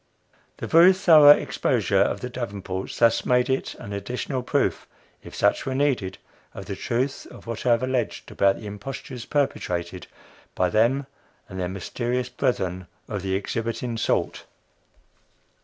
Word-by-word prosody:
The - - -5
very 170 +3 +7
thorough 165 -6 +7
exposure 145 - +3
of - - 0
the 125 - -4
Davenports 100 -6 -5
thus 115 -1 +3
made 125 +1 +2
is 130 - -2
an 100 - -8
additional 125 +5 -3
proof 125 - -1 0.3
if - - -11
such - - +1
were 130 - -1
needed 130 -10 0 0.4
of - - -7
the - - -5
truth 130 +4 -2
of - - -13
what 115 +1 -5
I - - +4
have 120 +1 +3
alleged 130 -1 -2
about 100 0 +3
the 110 - -10
impostures 120 +4 -7
perpetrated 90 - -2 0.5
by 90 -1 +1
them 120 +7 +2 0.4
and 95 -1 -8
their 90 -1 -2
"mysterious" 120 +6 -3
brethren 95 -6 -2 0.2
of 105 -3 -4
the 95 0 -1
exhibiting 115 +4 -3
sort. 115 - -1
120 Hz, 150 wpm, -24 LUFS, 100-130 Hz, 0.5 s, very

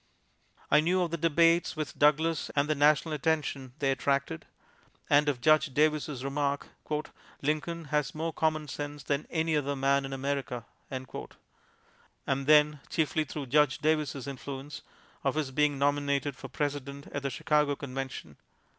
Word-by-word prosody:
I 150 - +7
knew 180 +4 +2
of 170 - -3
the 170 - -1
debates 165 +2 +3
with 150 -3 -5
Douglas 155 +2 +3
and 140 0 +2
the 155 - +2
national 150 +2 +3
attention 145 -4 -1
they 135 -2 +1
attracted, 140 - -1 0.6
and 145 +1 +5
of 130 -4 -2
Judge 155 0 +4
Davis' 150 -3 +1
remark, 140 0 -1 0.7
"Lincoln 155 +3 -1
has 150 0 -1
more 160 +1 -2
commonsense 150 -2 -2
than 140 +1 -1
any 160 -1 0
other 140 -1 0
man 140 +1 +2
in 135 - -5
America"; 135 -3 -3 0.2
and 135 +1 -8
then, 150 -1 +5
chiefly 155 -1 0
through 145 0 -5
Judge 140 +1 +3
Davis' 150 -4 0
influence, 140 +1 -7 0.4
of - - +1
his 150 -4 -1
being 150 +1 +2
nominated 140 -1 +1
for - - -9
President 140 -1 -4
at 140 - -3
the 140 - -1
Chicago 150 +2 +1
Convention. 135 - -6
145 Hz, 145 wpm, -29 LUFS, 140-155 Hz, 0.7 s, I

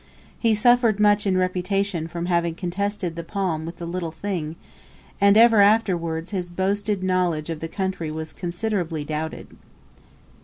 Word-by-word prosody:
He 225 -2 +3
suffered 235 -1 +4
much 205 -1 +4
in 185 -1 +2
reputation 185 -1 -1
from 170 +1 -4
having 170 -2 0
contested 185 0 -3
the 170 - -5
palm 165 -3 -2
with 170 +1 -7
the 170 - -6
"little 170 0 -3
thing," 165 -2 -4 0.7
and 200 +1 +6
ever 225 -2 +7
afterwards 180 -6 +2
his 180 -3 -3
boasted 195 +2 -1
knowledge 175 -4 0
of 160 - -4
the 165 - -4
country 190 -2 -3
was 155 0 -6
considerably 175 -3 -2
doubted. 155 +1 -5
185 Hz, 150 wpm, -23 LUFS, 165-200 Hz, 0.7 s, ever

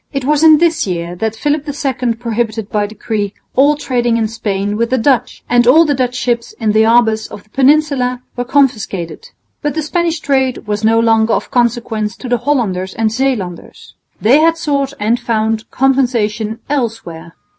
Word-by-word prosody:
It 275 -3 -3
was 295 +1 +2
in 315 -1 +8
this 330 -5 +1
year 170 -1 -3
that 220 +3 -2
Philip 295 +4 -1
II 260 -4 -2
prohibited 225 -2 -3
by 205 -1 0
decree 210 -1 -4 0.2
all 285 +3 +4
trading 240 -5 0
in 225 -1 0
Spain 205 -2 -3
with 230 +2 0
the 260 - +1
Dutch, 255 +1 0
and 240 0 +3
all 320 +7 +6
the 295 - +1
Dutch 250 -2 -1
ships 240 -2 -2
in 220 -3 -1
the 215 +1 +3
harbours 220 -1 +3
of 200 - -11
the 215 - -33
Peninsula 270 -2 +2
were 245 - -2
confiscated. 245 - -1 0.3
But 295 -1 -2
the 315 - -1
Spanish 335 +1 -1
trade 265 -4 0
was 210 0 -3
no 225 +1 +3
longer 225 -1 +3
of - - -2
consequence 235 -3 -1
to 255 - -8
the 245 -1 0
Hollanders 200 -10 -1
and 220 -1 0
Zeelanders. 225 -8 -3 0.3
They 250 +7 +4
had 330 +1 +3
sought 280 -4 -1
and 225 +3 +1
found 220 -1 -1
compensation 235 -4 0
elsewhere. 225 - -4
240 Hz, 175 wpm, -15 LUFS, 220-275 Hz, 0.3 s, in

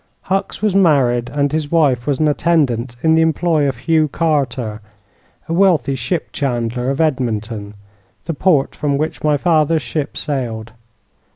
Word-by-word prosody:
Hucks 195 +2 -3
was 210 -3 +2
married, 130 -10 +3
and 145 0 0
his 155 -1 -2
wife 140 -7 +2
was 140 -2 +1
an 155 - +2
attendant 140 -6 +1
in 160 0 +4
the 160 - +4
employ 160 -2 +1
of 130 - -5
Hugh 155 +5 +2
Carter, 130 -9 -1 0.7
a 165 - -2
wealthy 170 -6 +3
ship 135 +6 -3
chandler 125 -2 -2
of 135 - -2
Edmunton, 115 -8 -2 0.5
the 165 - -2
port 150 -3 +2
from 145 -1 -1
which 155 +2 -3
my 150 -1 +2
fathers 160 -1 +2
ship 145 +4 -4
sailed. 115 -6 -3
145 Hz, 155 wpm, -18 LUFS, 125-160 Hz, 0.7 s, in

